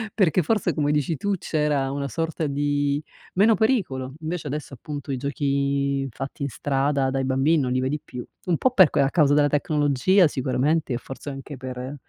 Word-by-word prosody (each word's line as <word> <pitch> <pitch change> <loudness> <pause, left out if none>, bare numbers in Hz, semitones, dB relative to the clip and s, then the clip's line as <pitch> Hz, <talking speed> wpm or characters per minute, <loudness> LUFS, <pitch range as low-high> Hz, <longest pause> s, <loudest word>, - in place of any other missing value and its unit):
perché 185 -5 +3
forse 210 +7 0
come 145 -1 0
dici 150 +1 0
tu 200 +7 -1
c'era 150 -5 0
una 140 0 -3
sorta 165 +1 -2
di, 145 +1 0 0.3
meno 210 +5 +5
pericolo 185 - 0
invece 160 0 -4
adesso, 145 0 -5
appunto 145 +2 -6
i 135 - -1
giochi 140 0 0
fatti 135 +4 -7
in 140 - -1
strada 135 +2 0
dai 135 0 -1
bambini 135 +4 +2
non 125 -2 -1
li 130 - +1
vedi 135 +4 -1
più 125 -5 -8 0.2
un 175 -3 +1
po' 260 - +2
per 185 -10 +6
a 140 -2 +3
causa 145 -4 +4
della 145 0 +4
tecnologia 150 +4 +3
sicuramente 140 +2 0
e - - 0
forse 135 +3 -8
anche 140 +1 -7
per, 130 +1 -6
145 Hz, 185 wpm, -24 LUFS, 135-155 Hz, 0.3 s, per